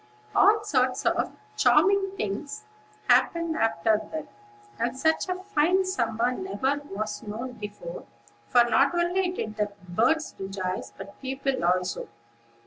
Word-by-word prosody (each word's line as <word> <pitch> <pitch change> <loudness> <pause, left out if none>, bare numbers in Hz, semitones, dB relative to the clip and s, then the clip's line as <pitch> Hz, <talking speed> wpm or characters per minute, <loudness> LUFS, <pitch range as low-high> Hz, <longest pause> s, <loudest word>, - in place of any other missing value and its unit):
All 430 +1 +5
sorts 255 -9 +1
of - - +1 0.2
charming 390 0 +4
things 245 - -4 0.4
happened 335 -1 +3
after 220 - +2
that, 315 -2 -4 0.5
and 240 +2 -1
such 320 +5 +1
a 365 - 0
fine 375 0 +2
summer 235 - 0
never 285 -3 -1
was 210 +1 -4
known 225 +4 -5
before; 225 - -8 0.4
for 245 -1 +6
not 270 +7 +3
only 355 +2 +1
did 215 -12 -5
the 210 -1 0 0.2
birds 245 - +1
rejoice, 190 -1 -4
but 200 - -11
people 270 -3 -2
also. 180 +1 0
260 Hz, 130 wpm, -27 LUFS, 215-345 Hz, 0.5 s, for